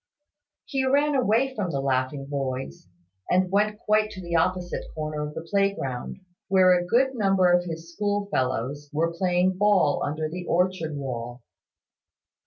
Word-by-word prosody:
He 270 -3 -1
ran 285 +3 +2
away 255 +1 +2
from 205 -6 -2
the 140 -4 -2
laughing 135 +1 -1
boys, 135 -7 -4 0.4
and 185 0 +2
went 210 +1 +2
quite 215 0 +1
to 190 -3 -9
the 170 0 -3
opposite 180 +1 0
corner 155 -1 -3
of 150 0 -5
the 165 - -7
playground, 195 -11 -1 0.3
where 185 -1 +5
a 175 -1 +2
good 260 +6 +3
number 195 -6 +3
of 175 0 +3
his 165 0 -7
schoolfellows 145 - -2
were 165 +3 0
playing 180 +1 +1
ball 200 -8 +3
under 155 +2 -2
the 175 +3 -7
orchard 175 -3 0
wall. 120 -3 -5
175 Hz, 150 wpm, -25 LUFS, 145-200 Hz, 0.4 s, where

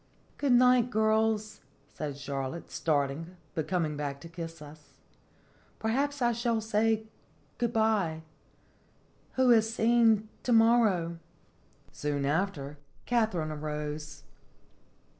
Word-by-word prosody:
"Good 280 -3 +2
night, 250 -1 +5
girls," 220 -1 +1 0.3
said 145 -3 -5
Charlotte, 140 +3 -5
start 145 -4 +1
ing, 165 +5 -8 0.2
but 155 -2 -3
coming 165 -4 0
back 145 -1 -4
to - - -9
kiss 165 -1 -7
us. 150 0 -14 0.4
" - - -33
Perhaps 275 +5 -1
I 240 - +4
should 230 -1 -1
say 220 0 +1 0.6
good 235 -1 0
by. 210 -8 +1 1.1
'Who 260 -1 +4
has 225 -1 +4
seen 225 -2 +3
to 250 - -2
morrow?'" 220 -8 +3 0.7
Soon 145 -1 -2
after, 150 -2 -2 0.3
Katharine 175 -11 0
rose. 150 0 -5
195 Hz, 115 wpm, -29 LUFS, 150-225 Hz, 1.1 s, night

